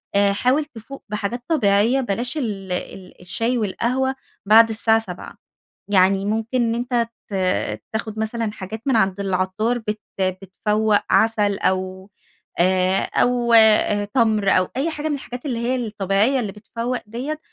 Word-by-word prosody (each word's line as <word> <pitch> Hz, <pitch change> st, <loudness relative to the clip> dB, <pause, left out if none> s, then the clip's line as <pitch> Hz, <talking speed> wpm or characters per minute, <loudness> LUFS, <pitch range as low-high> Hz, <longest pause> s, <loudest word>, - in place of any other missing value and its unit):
أ 200 Hz, 0 st, +4 dB
حاول 255 Hz, +8 st, +1 dB
تفوق 275 Hz, -1 st, -11 dB
بحاجات 210 Hz, +3 st, -3 dB
طبيعيّة 235 Hz, -3 st, +3 dB
بلاش 245 Hz, +5 st, -3 dB
ال 200 Hz, -8 st, -4 dB
ال 180 Hz, +1 st, -6 dB
الشاي 230 Hz, +7 st, -1 dB
والقهوة 250 Hz, +5 st, -1 dB, 0.3 s
بعد 225 Hz, +3 st, +7 dB
الساعة 225 Hz, 0 st, +2 dB
19:00. 180 Hz, -5 st, -9 dB, 0.5 s
يعني 195 Hz, 0 st, +3 dB
ممكن 225 Hz, +4 st, -1 dB
إن 230 Hz, 0 st, 0 dB
أنت 240 Hz, -1 st, -1 dB, 0.2 s
ت -, -, -11 dB, 0.6 s
تاخُد 220 Hz, 0 st, -4 dB
مثلًا 220 Hz, 0 st, -2 dB
حاجات 210 Hz, +2 st, -7 dB
من 265 Hz, -, +3 dB
عند 195 Hz, -3 st, +2 dB
العطار 195 Hz, +5 st, 0 dB
بت 215 Hz, -1 st, -4 dB, 0.2 s
بتفوَّق. 205 Hz, +3 st, 0 dB
عسل 210 Hz, -3 st, +2 dB
أو 185 Hz, +1 st, -2 dB, 0.5 s
آآ 185 Hz, +1 st, +3 dB
أو 245 Hz, -1 st, +1 dB
أ 215 Hz, -2 st, +5 dB
تَمْر 215 Hz, -2 st, +2 dB
أو 185 Hz, 0 st, +3 dB
أي 285 Hz, +5 st, 0 dB
حاجة 310 Hz, -1 st, -4 dB
من 295 Hz, -, 0 dB
الحاجات 250 Hz, -2 st, -8 dB
اللي 245 Hz, -5 st, -2 dB
هي 240 Hz, +2 st, 0 dB
الطبيعيّة 215 Hz, +1 st, 0 dB
اللي 215 Hz, -5 st, -3 dB
بتفوق 230 Hz, +4 st, -4 dB
ديّة، 260 Hz, +8 st, -4 dB
220 Hz, 145 wpm, -21 LUFS, 200-240 Hz, 0.6 s, بعد